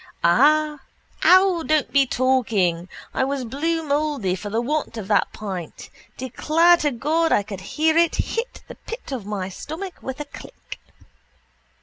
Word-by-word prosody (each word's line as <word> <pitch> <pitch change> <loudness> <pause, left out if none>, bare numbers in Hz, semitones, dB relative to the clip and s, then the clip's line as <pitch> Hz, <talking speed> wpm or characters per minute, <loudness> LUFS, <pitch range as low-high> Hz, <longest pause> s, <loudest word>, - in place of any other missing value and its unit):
Ah! 300 - +4 0.5
Ow! 370 -2 +6
Don't 310 -2 +1
be 275 -1 +4
talking! 210 -10 +1 0.2
I - - +1
was 270 -1 -2
blue 325 +7 -1
mouldy 285 -9 0
for 190 +3 -5
the 220 +3 -1
want 275 -1 -2
of 205 -4 -6
that 205 - +2
pint. 190 -6 -7 0.3
Declare 325 +7 +3
to 300 - 0
God 310 +6 0
I 205 - +3
could 195 -2 -8
hear 315 +11 0
it 335 0 +3
hit 465 +2 -3
the - - -9
pit 460 -8 -9
of 240 -7 -5
my 200 -3 -3
stomach 320 - -7
with 265 +1 -6
a 295 - -4
click. 285 - -11
280 Hz, 155 wpm, -22 LUFS, 210-315 Hz, 0.5 s, Ow